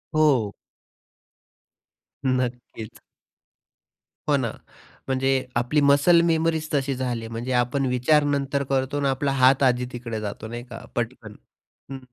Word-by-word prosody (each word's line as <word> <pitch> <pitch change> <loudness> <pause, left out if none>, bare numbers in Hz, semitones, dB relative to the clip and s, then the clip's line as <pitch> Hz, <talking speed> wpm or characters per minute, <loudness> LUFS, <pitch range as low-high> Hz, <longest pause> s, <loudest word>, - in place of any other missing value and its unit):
हो. 130 -10 +3 1.7
नक्कीच. 125 -3 -3 1.3
हो, 145 - +4
ना. 115 -4 -1 0.6
म्हणजे 135 0 0 0.3
आपली 125 +5 +1
मसल 145 +5 +5
मेमरीच 160 -1 +1
तशी 135 -1 0
झाली. 120 -3 -3
म्हणजे 115 +3 -5
आपण 135 +3 0
विचार 125 +4 +3
नंतर 140 -1 0
करतो 135 +1 0
आणि 140 - +1
आपला 135 +1 0
हात 135 +1 +4
आधी 125 -1 +2
तिकडे 115 -3 -5
जातो, 105 +1 -6
नाही 120 +1 -6
का? 115 - -9
पटकन. 115 -3 -4 0.6
हं, 135 - -5
130 Hz, 125 wpm, -24 LUFS, 120-140 Hz, 1.7 s, मसल